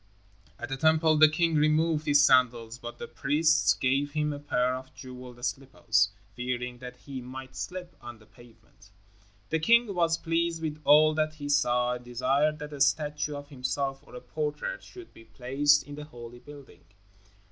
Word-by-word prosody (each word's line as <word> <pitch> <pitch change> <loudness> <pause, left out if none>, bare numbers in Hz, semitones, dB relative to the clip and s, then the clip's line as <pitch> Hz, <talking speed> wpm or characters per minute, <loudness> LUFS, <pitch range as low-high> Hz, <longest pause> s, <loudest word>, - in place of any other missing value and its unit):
At - - -7
the 135 - -3
Temple 160 +1 +3
the 155 0 +8
king 165 +1 +1
removed 155 +1 +2
his 145 0 +5
sandals, 120 -3 +2
but 120 -1 -8
the 235 - -7
priests 150 - +2
gave 135 +5 0
him 150 -1 -1
a 145 - -7
pair 125 -3 0
of 130 +1 -7
jeweled 125 -1 -9
slippers, 110 -6 0 0.3
fearing 125 0 -4
that 125 0 -9
he 130 0 -8
might 130 +1 -9
slip 180 -1 -6
on 120 -1 -9
the 110 - -20
pavement. 110 -2 -20 0.6
The 160 - +1
king 235 +4 +3
was 165 -2 +1
pleased 165 0 -1
with 155 -1 -5
all 155 +2 +6
that 155 0 -1
he 145 -1 -7
saw 125 -3 +2
and 125 0 -7
desired 135 +5 0
that 150 0 -8
a 140 - -7
statue 150 0 +1
of 145 0 -9
himself, 135 0 -3
or 145 - -16
a 125 - -8
portrait, 150 - -4
should 365 -2 -13
be 115 - -16
placed 140 +4 +2
in 145 - -11
the 150 +1 -8
holy 120 -4 -11
building. 145 0 -14
145 Hz, 180 wpm, -28 LUFS, 125-155 Hz, 0.6 s, the